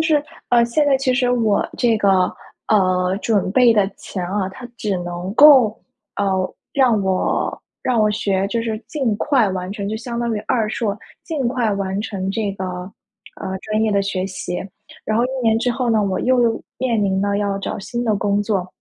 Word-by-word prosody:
就 - - +3
是， 300 -2 +2 0.2
呃， 235 -1 +5
现 265 +6 +1
在 275 -2 +4
其 260 -1 0
实 250 -1 +2
我 225 -4 +1
这 235 -3 +3
个， 190 -3 +3 0.4
呃， 185 -2 +2
准 200 -4 +1
备 245 -1 +6
的 205 -3 +2
钱 185 -3 -5
啊， 190 0 -1
它 245 +6 -9
只 200 -3 -1
能 175 +2 -5
够， 265 -7 +7 0.4
呃， 205 - 0 0.5
让 250 -6 +3
我 190 -1 -1 0.2
让 245 -3 +1
我 215 0 +3
学 195 -2 0
就 230 +1 -1
是 220 -2 -2
尽 260 -8 0
快 260 -8 +2
完 185 0 -4
成。 200 -1 -4
就 215 - -2
相 235 +1 -5
当 235 -1 -1
于 - - -2
二 220 -3 +1
硕， 210 -3 -2 0.3
尽 295 -7 -2
快 240 -3 0
完 195 0 -2
成 195 -3 -3
这 210 -1 -1
个， 190 -1 -5 0.8
呃， 190 -1 -3
专 215 0 -1
业 215 -2 +1
的 200 - +3
学 190 -1 -2
习， 180 -1 -5 0.5
然 215 - 0
后 240 - +3
1 - - -1
年 225 -1 +3
之 245 +1 0
后 240 -1 -1
呢， 215 -2 +3
我 190 -2 -1
又 245 -3 +2 0.2
面 235 -4 +1
临 190 0 +1
了 200 0 0
要 200 -1 -1
找 - - -4
新 240 +4 -4
的 215 -2 +1
工 200 +1 +1
作。 200 -4 -1
215 Hz, 215 characters per minute, -20 LUFS, 195-240 Hz, 0.8 s, 够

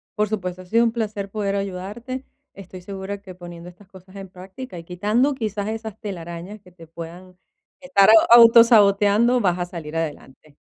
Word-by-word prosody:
por 210 0 0
supuesto, 185 -3 -5
ha - - -18
sido 230 +5 +2
un 230 - +1
placer 210 -3 -4
poder 200 -1 -3
ayudarte. 200 +7 -6 0.3
Estoy 185 -1 -11
segura 195 +1 -7
que 185 -3 -12
poniendo 175 -1 -11
estas 185 +2 -19
cosas 190 0 -17
en 195 -1 -9
práctica 185 +3 -10
y - - -11
quitando 215 +10 0
quizás 210 -3 -4
esas 220 -2 -7
telarañas 180 0 -8
que 180 -2 -20
te 165 -2 -16
puedan 175 +3 -11 0.4
estar 265 -8 +3
au 220 0 +8 0.2
autosaboteando, 230 0 +5
vas 180 -4 0
a 175 - -2
salir 165 -3 -9
adelante. 150 -2 -7
195 Hz, 175 wpm, -22 LUFS, 180-215 Hz, 0.4 s, au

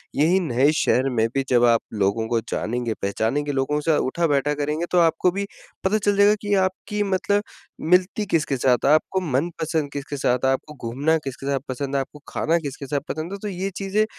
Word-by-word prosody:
यही 170 +6 +3
नए 145 -4 +2
शहर 130 +2 +2
में 115 -3 +1
भी 135 - +2
जब 120 -1 +4
आप - - 0 0.2
लोगों 110 +3 0
को 115 0 +1
जानेंगे, 120 0 -2
पहचानेंगे, 115 +9 -1
लोगों 140 +2 0
के 155 +2 +1
साथ 155 - +3
उठा-बैठा 145 -3 +1
करेंगे, 150 +3 -2
तो 180 - +4
आपको 165 +2 +3
भी 200 +2 -3 0.4
पता 190 +3 +2
चल 205 -1 +1
जाएगा 205 +1 +6
कि 205 -1 -1
आपकी 210 +3 -5
मतलब 205 +2 +1 0.5
मिलती 185 +4 +3
किसके 150 -7 0
साथ 125 -1 +2
है, 140 - +5
आपको 155 +5 +2 0.2
मनपसंद 160 -1 -2
किसके 145 0 -5
साथ 125 -1 +1
है, 130 - +4
आपको 135 +3 -3
घूमना 145 +7 +1
किसके 135 0 -6
साथ 140 -1 +1
पसंद 135 +2 -3
है, - - +3
आपको 150 +2 -9
खाना 165 +2 +1
किसके 140 -2 -6
साथ 145 +1 0
पसंद 155 +3 -4
है, - - -4
तो 210 - -4
ये 190 0 -3
चीज़ें 200 +3 +1
150 Hz, 205 wpm, -23 LUFS, 135-180 Hz, 0.5 s, जाएगा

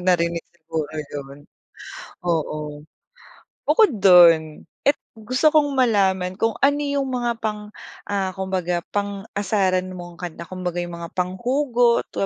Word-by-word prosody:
narinig 170 -2 +1
siguro 160 -2 -5 0.2
yun. 140 0 -8 0.8
Oo. 150 -3 -3 0.8
Bukod 440 -4 +5
dun 165 -4 +6 0.2
at 280 - +6 0.2
gusto 255 +8 +2
kong 295 -2 +3
malaman 190 -7 +2
kung 225 0 +1
ano 285 +1 +4
yung 280 -2 -1
mga 240 -2 -1
pang, 210 -1 -4 0.4
ah, 195 -2 -1
kumbaga 185 -2 -1 0.2
pang-asaran 200 -2 -1
mong 175 -1 -9
kanta. 170 -1 -7
Kumbaga 180 -1 -4
yung 175 0 -6
mga 170 0 -7
panghugot, 240 +6 +1
di - - -9
190 Hz, 120 wpm, -22 LUFS, 170-235 Hz, 0.8 s, dun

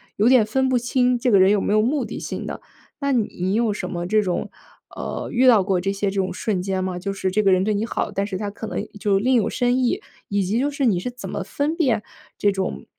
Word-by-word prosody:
有 215 +4 +3
点 250 -4 +6
分 265 +5 +1
不 255 - +3
清 245 0 +1
这 250 +1 +1
个 200 - +5
人 190 +1 +5
有 205 - +3
没 200 - 0
有 215 - +4
目 260 +2 0
的 - - -6
性 - - -5
的。 - - -6 0.4
那 280 -1 0
你 200 -6 0
有 225 -2 +1
什 185 -3 -5
么 175 0 -4
这 215 +3 +3
种 180 -3 -2 0.5
呃， - - -5
遇 255 +2 +3
到 225 -6 +7
过 185 -2 0
这 195 - 0
些 200 0 -1
这 195 - -6
种 190 -1 0
瞬 200 -5 -1
间 190 0 -2
吗？ 185 -1 -3
就 195 +2 -3
是 190 -1 -2
这 210 +3 +1
个 195 - +4
人 185 0 +3
对 215 - +1
你 205 +2 -1
好， - - -2
但 195 0 -1
是 195 -2 -4
他 205 0 -3
可 205 - -8
能 - - -3 0.2
就 195 -1 +2
另 255 +5 +2
有 230 - +2
深 245 0 +1
意， 260 - +1 0.3
以 200 -1 +1
及 200 +5 0
就 280 +4 +1
是， 280 -1 -1
你 210 -7 +3
是 245 +7 -4
怎 250 - -8
么 - - -3
分 295 +3 -2
辨 255 -10 +1 0.4
这 205 - +2
种 190 -1 -3
210 Hz, 290 characters per minute, -22 LUFS, 195-245 Hz, 0.5 s, 到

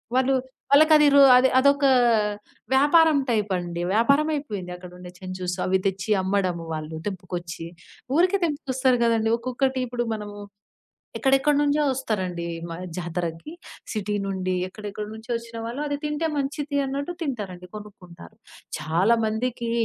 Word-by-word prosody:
వాళ్ళు 260 +1 +3 0.4
వాళ్ళకది 300 +1 +6
రు 280 - +8 0.2
అది 260 +1 +4
అదొక 280 +2 +3 0.9
వ్యాపారం 305 +3 +5
టైప్ 210 -3 0
అండి. 175 -1 -5
వ్యాపారం 280 +8 +3
అయిపోయింది 205 -11 -5
అక్కడుండే 180 0 -11
చెంచూస్ 185 -1 -4
అవి 190 +1 +2
తెచ్చి 195 +2 -3
అమ్మడము, 185 -3 0
వాళ్ళు 155 +1 -6
తెంపుకొచ్చి. 175 -3 -6 0.5
ఊరికే 370 +3 +3
తెంపుకొస్తారు 265 -5 0
గదండీ! 225 -1 +1
ఒక్కొక్కటి 260 +2 -1
ఇప్పుడు 240 0 -2
మనము 205 -1 -8 0.8
ఎక్కడెక్కడ 270 +2 +3
నుంచో 295 +1 +2
వస్తారండి 195 -10 -2 0.3
మా 165 - -5 0.2
జాతరకి. 170 - -4 0.4
సిటీ 210 -1 -2
నుండి, 185 -1 -2
ఎక్కడెక్కడి 210 +1 -7
నుంచో 220 +2 -11
వచ్చిన 230 0 -8
వాళ్ళు 240 +5 -5
అది 290 0 -1
తింటే 300 +2 -1
మంచిది 285 0 -2
అన్నట్టు 280 +5 -3
తింటారండి. 200 - -5
కొనుక్కుంటారు. 205 -3 -12 0.4
చాలామందికి 220 +8 0
220 Hz, 125 wpm, -24 LUFS, 185-275 Hz, 0.9 s, రు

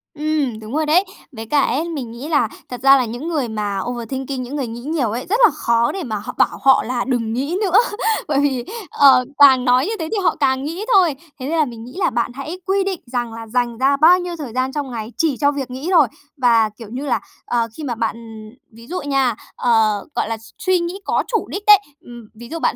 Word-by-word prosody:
Ừm, 300 -6 -1
đúng 220 +2 -9
rồi 310 0 +1
đấy. 325 +5 +4 0.3
Với 225 -4 -8
cả 285 +5 +2
ấy, 275 +5 0
mình 270 -8 -5
nghĩ 240 +5 -8
là 310 -2 +2 0.2
thật 250 -2 -7
ra 275 +1 +7
là 255 - +1
những 240 +7 -6
người 300 -7 -1
mà 210 -3 -3
overthinking, 255 +2 -4
những 255 +4 -6
người 275 -4 -2
nghĩ 230 +1 -7
nhiều 285 -3 -1
ấy, 240 +3 -4
rất 440 +5 +1
là 440 - +5
khó 235 0 +1
để 385 - -5
mà 230 -6 -4
họ 205 0 -6
bảo - - +2
họ 270 -1 +5
là 245 +1 -2
"Đừng 235 -4 -1
nghĩ 280 +9 -1
nữa!" 390 -2 +3 0.5
bởi 285 -3 +1
vì, 270 -4 0 0.3
ờ, 260 -3 +5
càng 265 -3 +7
nói 250 +1 +4
như 415 - -2
thế 320 - -3
thì 445 - 0
họ - - +2
càng 265 -1 +1
nghĩ 335 +8 -4
thôi. 355 -7 +4 0.2
Thế 255 - -5
nên 330 - 0
là 310 - +3
mình 235 -4 -9
nghĩ 245 - -11
là 380 - +2
bạn 235 0 -1
hãy 300 +7 -6
quy 390 +1 +1
định 380 -3 -3
rằng 240 -2 -3
là 225 0 -8
dành 240 0 -1
ra 270 +3 +2
bao 340 +5 +6
nhiêu 355 -1 -4
thời 275 -7 -7
gian 255 +1 -1
trong 285 -2 -4
ngày 225 -1 -5
chỉ 310 -6 +1
cho 285 -1 +3
việc 275 -3 -5
nghĩ 265 +6 -6
thôi. 320 -7 +5 0.3
Và, 230 -4 +3
kiểu 225 -3 -10
như 260 +4 -5
là, 265 - +1 0.3
ờ, 235 -1 0
khi 310 - -6
mà 250 -5 -3
bạn 225 -1 -1
ừm, 225 -1 -11 0.2
ví 230 +1 -13
dụ 365 +3 -4
nha, 270 -4 +1 0.2
ờ, 220 -4 +2
gọi - - -1
là 225 - -2
s 225 - -15
suy 370 -1 +2
nghĩ 345 +3 -4
có - - +1
chủ 455 - -1
đích 400 - -5
đấy, 415 -1 +9 0.2
ừm, 240 -5 -12
ví 235 +2 -11
dụ 330 - -4
bạn - - 0
260 Hz, 255 wpm, -19 LUFS, 235-310 Hz, 0.5 s, đấy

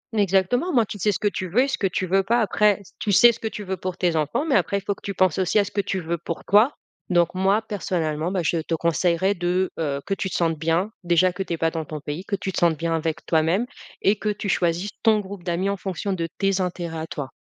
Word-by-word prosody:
Exactement, 200 - +2
au - - -2
moins 235 -4 +4
tu 205 - -8
sais 210 +3 +2
ce 175 - -2
que 210 - 0
tu 185 -3 -3
veux 245 +8 +3
et 275 - 0
ce 270 - -1
que 195 - +2
tu 185 +1 -2
veux 195 +2 +3
pas, 235 +5 +1
après, 210 -1 +2 0.2
tu 205 - -1
sais 240 +5 +7
ce 230 - -10
que 220 - -3
tu 210 - -6
veux 190 -1 -3
pour 185 +1 -5
tes 175 -3 +1
enfants, 155 - 0
mais 300 - 0
après 200 - +2
faut 200 +1 -2
que - - -19
tu 200 - -5
penses 185 -1 +2
aussi 185 +3 +1
à 205 - +5
ce 195 - -7
que 200 - 0
tu 190 -1 -3
veux 170 0 -3
pour 170 - -6
toi, 215 +8 +5 0.4
donc 175 -1 +2
moi 195 +4 +2
personnellement, 170 -6 -2
bah, 185 -2 0
je 165 +2 +1
te 165 +1 -1
conseillerais, 170 +3 +1
de, 180 +1 0
heu, 140 -3 -1
que 195 - -1
tu 190 -1 -2
te - - -5
sentes 165 -3 0
bien. 165 +6 0
Déjà 175 +1 +3
que 195 - -5
tu 180 - -3
es 165 - -2
pas 165 0 +1
dans 160 -1 -3
ton 155 0 -6
pays. 150 +5 -5
Que 200 - -1
tu 190 0 -4
te - - -6
sentes 170 -2 +3
bien 165 +1 -1
avec 160 +1 -3
toi-même, 165 +7 +2 0.4
et 200 - +4
que 210 - -2
tu 205 -1 -3
choisisses 175 +3 0
ton 220 -2 +4
groupe 195 -2 -8
d'amis 180 +2 -1
en 200 - -1
fonction 190 +1 -3
de 170 -3 -2
tes 195 -1 +1
intérêts 170 -3 -3
à 160 - -5
toi. 140 -3 -5
185 Hz, 280 wpm, -23 LUFS, 170-200 Hz, 0.4 s, sais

